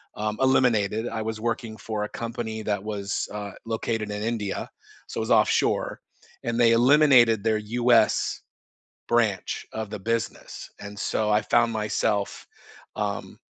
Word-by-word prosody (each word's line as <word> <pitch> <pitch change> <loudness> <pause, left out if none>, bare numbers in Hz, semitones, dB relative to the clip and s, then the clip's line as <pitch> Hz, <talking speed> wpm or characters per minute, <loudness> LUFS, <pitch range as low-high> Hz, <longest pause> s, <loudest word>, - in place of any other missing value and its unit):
um, 105 0 -2
eliminated, 115 -4 +2
I 110 -1 -3
was 110 0 -4
working 115 -1 -2
for 110 -1 -3
a - - -8
company 115 -1 -5
that 105 -2 -1
was, 105 -1 -3
uh, 105 -1 -5
located 110 -1 -2
in 105 0 -4
India, 110 -3 -2 0.4
so - - -8
it - - 0
was - - -3
offshore, - - +2 0.5
and 115 -1 -1
they 115 -1 +6
eliminated 120 -3 +5
their 110 -1 +2
US 115 +1 +2 0.7
branch 110 -5 0
of 110 -2 -4
the 105 - -5
business, 115 +1 -4
and 100 0 -8
so 105 +1 0
I 105 +1 +3
found 120 +2 +2
myself, 105 -1 -1 0.5
um, - - -3
110 Hz, 145 wpm, -25 LUFS, 105-115 Hz, 0.7 s, they